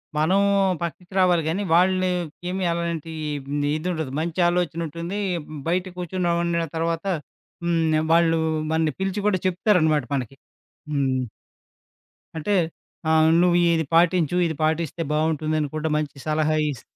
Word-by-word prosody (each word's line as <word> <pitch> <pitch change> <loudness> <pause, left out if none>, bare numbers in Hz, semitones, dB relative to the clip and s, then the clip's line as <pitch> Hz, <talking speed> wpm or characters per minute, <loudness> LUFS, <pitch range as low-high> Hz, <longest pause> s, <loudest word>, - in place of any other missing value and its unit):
మనం 160 +6 +3 0.4
పక్కికి 175 +2 -6
రావాలి 180 -3 +4
గానీ, 180 +6 -1
వాళ్ళకేమి 180 0 +1
అలాంటి 170 -1 -3 0.4
హ్మ్ 145 +1 -1
ఇదుండదు. 160 -4 -3
మంచి 170 +2 -3
ఆలోచన 175 -2 -1
ఉంటుంది. 170 +6 -5 0.5
బయట 180 +2 +1
కూర్చొని 180 +1 -3
నవన్నా 170 -1 0
తర్వాత. 165 +2 -1 0.6
హ్మ్. 170 -1 +1 0.2
ఆహ్, 160 - -2
వాళ్ళు 165 -1 +4 0.3
మనని 160 -2 +1
పిలిచి 195 +1 -1
కూడా 190 -3 +2
చెప్తారనమాట 170 - +2
మనకి. 135 0 -4 0.6
హ్మ్. 130 -3 0 1.1
అంటే. 195 +6 0 0.5
ఆహ్, 160 0 +5
"నువ్వు 175 -1 +4 0.2
ఇది 160 - +1
పాటించు, 170 -1 +3
ఇది 160 - -3
పాటిస్తే 160 +1 -1
బావుంటుందని 155 0 0
కూడా, 155 +1 -1
మంచి 150 -2 -3
సలహా 155 0 +1 0.2
ఇస్" 130 - -8
165 Hz, 125 wpm, -23 LUFS, 155-180 Hz, 1.1 s, ఆహ్